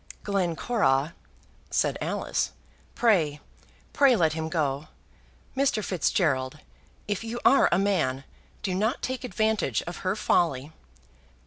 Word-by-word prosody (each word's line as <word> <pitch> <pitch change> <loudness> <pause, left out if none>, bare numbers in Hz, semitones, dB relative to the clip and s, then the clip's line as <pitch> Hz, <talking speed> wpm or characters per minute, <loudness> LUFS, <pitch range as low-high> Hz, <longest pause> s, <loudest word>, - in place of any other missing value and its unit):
"Glencora," 175 - +1 0.6
said - - +1
Alice, - - -1 0.4
"pray, 165 -11 +2 0.5
pray 275 -3 +5
let 160 -6 +2
him 160 0 -3
go. 150 -3 -1 0.7
Mr. 260 -6 +1
Fitzgerald, 150 -7 0 0.5
if 205 +1 -2
you 230 +1 -4
are 275 - +6
a 175 - +4
man, 165 -10 +1 0.4
do 190 - -1
not 215 +8 0
take 260 0 -3
advantage 220 - 0
of 175 0 -7
her 185 +1 -1
folly." 155 -9 +1
180 Hz, 115 wpm, -27 LUFS, 150-220 Hz, 0.7 s, are